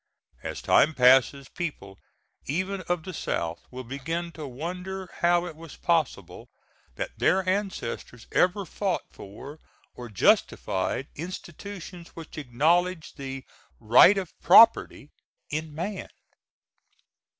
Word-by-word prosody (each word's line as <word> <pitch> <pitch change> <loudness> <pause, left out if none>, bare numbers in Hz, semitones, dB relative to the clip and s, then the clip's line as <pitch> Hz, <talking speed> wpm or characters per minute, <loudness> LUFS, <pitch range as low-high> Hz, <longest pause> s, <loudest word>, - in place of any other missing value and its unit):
As - - -6
time 155 +1 +4
passes, 130 +2 +4
people, 100 - -6 0.5
even 185 +6 -2
of 175 -2 0
the 185 - -7
South, 85 - -3
will 130 0 -8
begin 160 +7 -4
to 155 -3 -8
wonder 180 +8 -6
how 175 0 +3
it 170 -3 -7
was 165 -1 -11
possible 130 - -1 0.5
that - - -6
their 190 0 +2
ancestors 185 - -3
ever 190 +2 +2
fought 190 0 -2
for 140 +10 -11 0.3
or 120 -1 -9
justified 95 +3 +1
institutions 175 +1 -8
which 160 -1 -9
acknowledged 160 +7 0
the 135 -1 -6 0.3
right 120 - +7
of 185 -4 -4
property 225 -9 +6 0.4
in 155 +1 -3
man. 185 +4 -4
160 Hz, 115 wpm, -26 LUFS, 130-180 Hz, 0.5 s, right